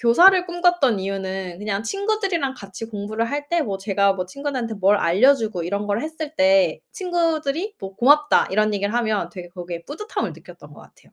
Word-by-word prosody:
교사를 355 +11 +6
꿈꿨던 345 - +2
이유는 190 -2 -4
그냥 210 0 -3
친구들이랑 395 - -1
같이 200 -1 -9
공부를 215 +1 -3
할 290 0 -3
때 340 -1 +1
뭐 195 -7 -3
제가 200 0 +1
뭐 185 -1 -4
친구들한테 255 0 -4
뭘 200 +1 +3
알려 205 +13 +4
주고 220 -8 -3
이런 200 +4 -3
걸 205 +2 0
했을 315 -1 -6
때 285 0 +3
친구들이 340 -1 -1
뭐 195 0 -7
"고맙다." 295 +4 +4
이런 215 +1 +2
얘기를 200 +1 -1
하면 220 -4 0
되게 180 -2 -9
거기에 175 -1 -7
뿌듯함을 420 +10 -4
느꼈던 - - -14
것 - - -14
같아요. - - -22
230 Hz, 400 characters per minute, -22 LUFS, 195-305 Hz, -, 교사를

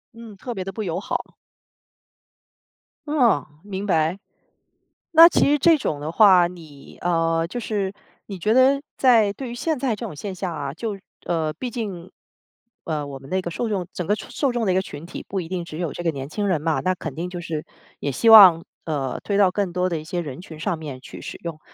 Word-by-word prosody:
嗯， 225 -3 -11
特 245 +5 -6
别 190 -4 -4
地 195 - -5
不 215 +3 -5
友 175 -2 -2
好。 - - -4 1.7
哦， 250 - +3 0.2
明 200 0 -5
白。 165 -1 +1 1.0
那 330 +1 +10
其 345 - +3
实 295 - +4
这 325 +2 +5
种 150 - -2
的 150 +2 -4
话， 185 -3 +6
你， 155 -6 -13
呃， 165 -1 +1
就 240 +7 -5
是 200 -3 -2 0.3
你 195 - -6
觉 210 +5 0
得 265 +3 +4
在 230 -6 +4
对 255 +4 -7
于 - - -6
现 305 +5 -1
在 250 -3 0
这 210 - -7
种 - - -6
现 195 +5 -5
象 185 -1 -4
啊， 140 -3 -4
就， 210 0 -4 0.3
呃， 160 -2 -1
毕 250 +9 -5
竟， 195 -7 -5 0.7
呃， 150 -3 -3
我 140 -1 -7
们 135 - -13
那 190 - +1
个 175 -2 -5
受 235 +6 -2
众 190 -5 -2
整 180 - -4
个 205 +5 +1
受 - - -9
受 280 - 0
众 240 -2 -1
的 185 - +3
一 - - 0
个 190 - +2
群 165 -4 -9
体 - - -8
不 195 - -2
一 170 - -6
定 180 -2 -3
只 160 -2 -8
有 170 -4 -2
这 - - -6
个 170 - +1
年 135 -2 -6
轻 205 +6 -2
人 165 -5 +1
嘛， 160 0 0
那 185 0 0
肯 160 -5 -6
定 175 +4 -4
就 180 -1 -6
是 160 -3 -4 0.4
也 140 - -2
希 225 - +1
望， 190 -7 +9 0.2
呃， 140 -5 -2
推 200 -1 -1
到 190 -3 +4
更 195 -3 -1
多 180 +1 0
的 170 -3 -2
一 - - -9
些 170 +3 -3
人 145 -4 -7
群 165 -4 -11
上 175 +2 -1
面 145 -5 -8
去 - - -11
使 - - -7
用。 160 -2 -5
180 Hz, 245 characters per minute, -23 LUFS, 160-215 Hz, 1.7 s, 那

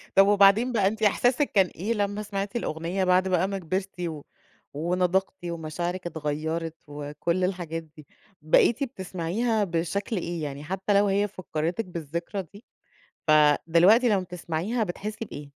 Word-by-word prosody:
طَب 195 +1 +7
وبعدين 205 +4 +5
بقى 205 -5 +2
أنتِ 220 +2 -2
إحساسِك 245 +7 +2
كان 195 -3 +5
إيه 210 +7 -1
لمّا 205 0 -1
سمَعتِ 200 +1 -4
الأغنية 175 -2 -2
بَعد 185 +1 +3
بقى 185 0 +2
ما 195 0 -3
كبَرتِ 185 +2 -4
و 160 -4 -4 0.5
ونضجتِ 180 +4 0
ومشاعرِك 175 +2 -4
اتغيّرت 160 +1 -3
وكل 150 +5 -2
الحاجات 170 -3 -2
دي؟ 155 -1 -17 0.3
بقيتِ 235 - +3
بتسمَعيها 210 0 -1
بشكل 180 +4 -2
إيه، 170 -2 -3
يعني 145 0 -5
حتّى 190 +5 -1
لو 200 +1 +4
هي 200 +1 +2
فكّرِتِك 180 +1 -3
بالذكرى 170 +3 -4
دي، 200 +7 -15 0.6
فدلوقتي 165 - +5
لمّا 200 -3 +2
بتسمَعيها 180 +6 -2
بتحسي 210 +4 -5
بإيه؟ 145 -5 -9
180 Hz, 145 wpm, -26 LUFS, 165-200 Hz, 0.6 s, طَب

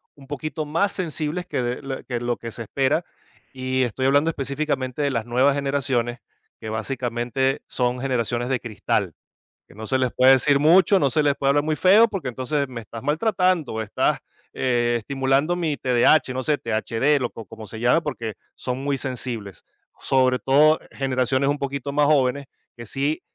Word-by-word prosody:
un 135 -2 -16
poquito 150 +2 -4
más 165 +7 +1
sensibles 170 0 -3
que 155 - -2
de 120 +2 -3
lo 135 -1 -6
que 120 -2 -3
lo 120 0 -1
que 115 -1 -8
se 115 - -6
espera, 135 - 0 0.5
y 130 0 -1
estoy 130 +3 -1
hablando 145 +4 +3
específicamente 140 -2 -2
de 140 -1 +1
las 115 -3 -2
nuevas 130 +4 +2
generaciones, 135 -4 -1 0.4
que 110 - -8
básicamente 120 +3 -2
son 125 0 -1
generaciones 120 -2 -1
de 130 -2 0
cristal, 105 -5 -2 0.5
que - - -18
no 110 0 -7
se 130 +3 0
les 130 -2 +1
puede 130 +1 +6
decir 140 +2 +4
mucho, 180 +5 +5
no 140 -5 +2
se 155 - +2
les 145 -1 +2
puede 135 - 0
hablar 145 +1 +3
muy 155 0 0
feo, 205 +7 +6
porque 185 - -4
entonces 135 +3 -2
me 120 -2 -7
estás 115 +1 -10
maltratando 180 - +1
o 110 - -2
estás, 105 - 0 0.4
eh, 120 -2 +1
estimulando 135 +6 0
mi 160 -5 -1
TDH, 130 +3 +3
no 130 - -2
sé, 150 +2 +1
THD 115 +6 0
lo 125 - -1
co 115 - -10
como 110 +1 -11
se 110 +3 -8
llame, 125 +8 +3
porque 115 -8 -4 0.2
son 125 0 -4
muy 140 -1 0
sensibles, 120 - -5 0.4
sobre 130 -1 +2
todo 150 +4 +4
generaciones 130 0 0
un 145 - 0
poquito 140 0 -3
más 145 0 +2
jóvenes 140 -1 +2 0.3
que 120 - -8
sí 140 +7 -2
135 Hz, 185 wpm, -23 LUFS, 120-145 Hz, 0.5 s, puede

